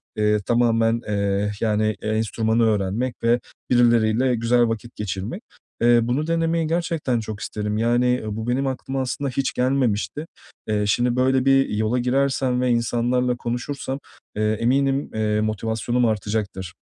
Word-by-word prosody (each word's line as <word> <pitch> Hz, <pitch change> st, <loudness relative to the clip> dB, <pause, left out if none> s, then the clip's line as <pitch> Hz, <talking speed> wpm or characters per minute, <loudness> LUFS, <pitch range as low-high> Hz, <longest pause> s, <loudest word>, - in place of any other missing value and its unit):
eee, 105 Hz, 0 st, +2 dB
tamamen, 115 Hz, -1 st, +2 dB
eee, 100 Hz, 0 st, 0 dB
yani, 110 Hz, -1 st, +1 dB
enstrümanı 110 Hz, +1 st, 0 dB
öğrenmek 110 Hz, +3 st, 0 dB
ve 120 Hz, +1 st, +3 dB, 0.3 s
birileriyle 120 Hz, 0 st, +3 dB
güzel 120 Hz, +1 st, +2 dB
vakit 115 Hz, +1 st, -5 dB
geçirmek. 105 Hz, -, -4 dB, 0.4 s
Eee, 120 Hz, 0 st, +5 dB
bunu 130 Hz, +7 st, -1 dB
denemeyi 165 Hz, -1 st, +1 dB
gerçekten 165 Hz, -7 st, -1 dB
çok 110 Hz, -2 st, -6 dB
isterim. 105 Hz, 0 st, -3 dB
Yani, 120 Hz, +2 st, +2 dB
bu 110 Hz, +2 st, -4 dB
benim 135 Hz, +3 st, 0 dB
aklıma 135 Hz, 0 st, -3 dB
aslında 135 Hz, +2 st, -2 dB
hiç 130 Hz, +1 st, -1 dB
gelmemişti. 130 Hz, +2 st, 0 dB, 0.4 s
Eee, 105 Hz, -1 st, 0 dB
şimdi 120 Hz, +4 st, +1 dB
böyle 130 Hz, +1 st, +2 dB
bir 135 Hz, 0 st, +4 dB
yola 110 Hz, +4 st, 0 dB
girersem 130 Hz, 0 st, +1 dB
ve 125 Hz, -, +1 dB
insanlarla 120 Hz, +1 st, +1 dB
konuşursam, 130 Hz, +3 st, -4 dB, 0.4 s
eee, 105 Hz, 0 st, +1 dB
eminim, 135 Hz, +3 st, +1 dB
eee, 105 Hz, -1 st, 0 dB
motivasyonum 110 Hz, +3 st, -1 dB
artacaktır. 105 Hz, -4 st, -2 dB
120 Hz, 135 wpm, -22 LUFS, 110-130 Hz, 0.4 s, Eee